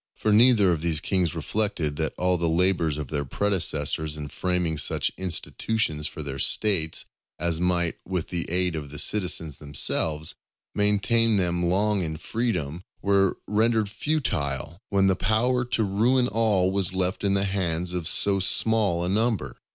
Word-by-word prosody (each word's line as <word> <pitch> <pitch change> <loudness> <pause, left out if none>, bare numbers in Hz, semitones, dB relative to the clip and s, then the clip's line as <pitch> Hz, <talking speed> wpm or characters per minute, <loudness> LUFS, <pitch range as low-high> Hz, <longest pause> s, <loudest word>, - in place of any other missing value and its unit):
For 110 - -1
neither 110 -4 +5
of 80 -3 -1
these 80 -3 0
kings 90 -2 -1
reflected 100 -9 -1
that 80 -1 -1
all 90 0 +1
the 85 -1 0
labours 85 -3 +1
of 75 -4 -6
their 70 -2 -2
predecessors 80 -3 0
in 75 -1 -6
framing 90 -2 -1
such - - 0
institutions 90 -2 -2
for 75 - -7
their 70 -1 -5
States, 85 -5 +3 0.3
as 85 0 0
might, 90 -1 0
with 90 -3 -4
the 85 -2 -4
aid 90 0 +1
of 75 -3 -6
the 75 - -7
citizens 85 -6 +1
themselves, 75 +2 0 0.4
maintain 105 +2 +2
them 90 -2 0
long 100 +3 +1
in 80 -2 -4
freedom, 90 -8 -3 0.2
were 100 -1 +2
rendered 110 0 +1
futile, 85 - -2
when 100 -1 +2
the 95 -1 +3
power 120 +6 +1
to 120 -2 -1
ruin 120 +6 +2
all 105 -5 +1
was 95 -2 0
left 95 +1 -1
in 100 -1 +1
the 100 - +1
hands 90 -3 -2
of 90 -3 -2
so 100 -1 +3
small 95 -2 +1
a - - -2
number. 110 +2 -1
90 Hz, 160 wpm, -25 LUFS, 80-105 Hz, 0.4 s, neither